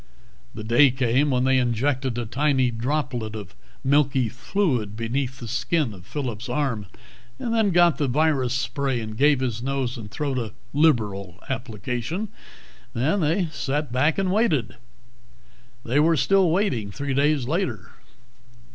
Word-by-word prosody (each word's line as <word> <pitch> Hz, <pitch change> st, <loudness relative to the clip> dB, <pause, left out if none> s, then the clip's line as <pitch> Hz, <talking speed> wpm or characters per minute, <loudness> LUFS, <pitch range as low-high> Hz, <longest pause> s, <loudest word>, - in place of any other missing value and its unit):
The 110 Hz, -, -6 dB
day 120 Hz, +6 st, +5 dB
came 130 Hz, +3 st, +1 dB
when 125 Hz, -2 st, +1 dB
they 130 Hz, 0 st, +3 dB
injected 125 Hz, +1 st, 0 dB
a 120 Hz, -, -2 dB
tiny 130 Hz, +1 st, +1 dB
droplet 120 Hz, -2 st, -2 dB
of 100 Hz, -3 st, -8 dB, 0.3 s
milky 135 Hz, -3 st, +2 dB
fluid 125 Hz, -, -1 dB
beneath 125 Hz, +3 st, -2 dB
the 120 Hz, -, -7 dB
skin 130 Hz, +1 st, 0 dB
of 90 Hz, -3 st, -14 dB
Phillip's 125 Hz, -4 st, -4 dB
arm, 125 Hz, -6 st, -1 dB, 0.5 s
and 230 Hz, -, -3 dB
then 220 Hz, -3 st, +3 dB
got 175 Hz, -5 st, +4 dB
the 145 Hz, -, +1 dB
virus 140 Hz, -2 st, +1 dB
spray 135 Hz, -1 st, -1 dB
and 110 Hz, -1 st, -6 dB
gave 145 Hz, +2 st, +3 dB
his 120 Hz, -3 st, -2 dB
nose 130 Hz, -1 st, -2 dB
and 105 Hz, -3 st, -8 dB
throat 135 Hz, +3 st, -2 dB
a 110 Hz, -4 st, -5 dB, 0.2 s
liberal 105 Hz, -, +1 dB
application. 125 Hz, -, -3 dB, 0.7 s
Then 140 Hz, +12 st, +1 dB
they 165 Hz, +3 st, +1 dB
sat 145 Hz, -1 st, -2 dB
back 140 Hz, +6 st, +2 dB
and 190 Hz, -2 st, +1 dB
waited. 185 Hz, -, +1 dB, 1.1 s
They 125 Hz, +5 st, +2 dB
were 160 Hz, +2 st, +4 dB
still 190 Hz, +6 st, +3 dB
waiting 160 Hz, -, 0 dB
three 140 Hz, +6 st, -3 dB
days 140 Hz, -1 st, +2 dB
later. 135 Hz, -, -2 dB
130 Hz, 145 wpm, -24 LUFS, 115-150 Hz, 1.1 s, day